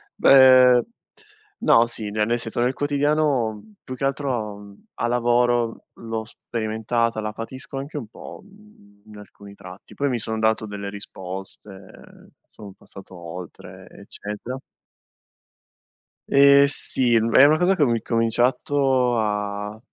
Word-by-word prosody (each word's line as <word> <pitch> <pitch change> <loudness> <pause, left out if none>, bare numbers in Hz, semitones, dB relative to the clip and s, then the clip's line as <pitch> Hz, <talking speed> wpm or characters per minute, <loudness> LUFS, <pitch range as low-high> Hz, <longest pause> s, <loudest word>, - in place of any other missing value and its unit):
Beh, 130 -2 +6 0.8
no 115 +1 +5
sì, 110 -3 -6
ne 105 0 0
nel 120 +2 0
senso 115 +1 -5
nel 125 +2 +1
quotidiano, 145 -4 0
mhmm, 110 - -15
più 130 - -7
che 130 - -3
altro, 125 -7 -3
mhmm, 100 0 -15
a 120 - -2
lavoro 120 -1 0
l'ho 115 -1 -6
sperimentata, 115 0 -3
la 105 0 -4
patisco 130 +5 -8
anche 140 +3 -6
un 125 -7 -6
po', 110 - -12
mhmm, 195 - -22
in 105 -1 -13
alcuni 100 -1 -14
tratti. 90 -1 -13
Poi 140 0 -1
mi 120 -3 -2
sono 110 +1 -4
dato 110 0 0
delle 100 -1 -6
risposte, 95 0 -11 0.2
sono 100 -3 -12
passato 95 -1 -13
oltre, 85 0 -10
eccetera. 105 +5 -8 1.7
Ehm, 140 0 +6
sì, 130 -3 0
è - - +5 0.3
una 155 +2 +4
cosa 180 +3 +2
che 155 - +2
ho 135 - +2
i - - +2
incominciato 125 +3 +1
a 105 0 -3
115 Hz, 140 wpm, -22 LUFS, 105-130 Hz, 1.7 s, Beh